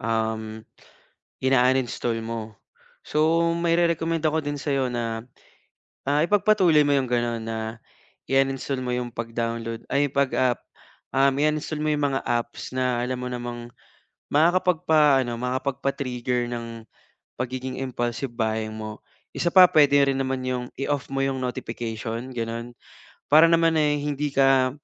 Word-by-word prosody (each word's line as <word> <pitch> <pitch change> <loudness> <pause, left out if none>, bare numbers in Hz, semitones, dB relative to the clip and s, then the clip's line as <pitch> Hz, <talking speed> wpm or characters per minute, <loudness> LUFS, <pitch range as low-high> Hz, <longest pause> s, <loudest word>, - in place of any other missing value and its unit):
um, 110 -1 -2 0.8
ina-uninstall 125 -2 +1
mo. 115 -2 -6 0.5
So, 160 +2 +2 0.2
mairerekomenda 165 -1 +1
ko 155 0 0
din 145 0 -3
sa'yo 135 -2 -1
na, 115 -2 -3 0.8
ah, 145 +2 +2
ipagpatuloy 190 -4 +4
mo 145 - +2
yung 135 -2 +1
gano'n 120 -1 0
na 110 0 -4 0.7
i-uninstall 135 -1 0
mo 125 - -2
yung 125 0 -2
pag-download, 115 0 -4
ay, 140 -1 +1
pag 140 -1 +2
ah, 125 -2 +2 0.6
um, 135 0 +5
i-uninstall 155 0 0
mo 155 - -1
yung 150 -1 +1
mga 135 - 0
apps 120 0 -3
na 125 -2 +1
alam 125 +1 -2
mo 125 - -5
namang 120 -1 -5 0.7
makakapagpa-ano, 155 -6 +3
makakapagpa-trigger 125 -1 -2
ng 120 -1 -4 0.8
pagiging 130 +1 -4
impulsive 120 0 -3
buying 110 -1 -1
mo. 110 -1 -7 0.3
Isa 175 - 0
pa, 185 +1 +8
puwede 145 -2 +5
rin 135 -1 0
naman 130 -1 -2
yung 125 -1 -2
i-off 140 0 -2
mo 135 0 0
yung 135 -1 -1
notification, 115 0 -4
gano'n 115 +1 -4 0.5
para 160 +3 +6
naman 165 -1 +4
ay 150 -1 +2
hindi 145 0 -2
ka 135 -1 +4
130 Hz, 135 wpm, -24 LUFS, 120-145 Hz, 0.8 s, pa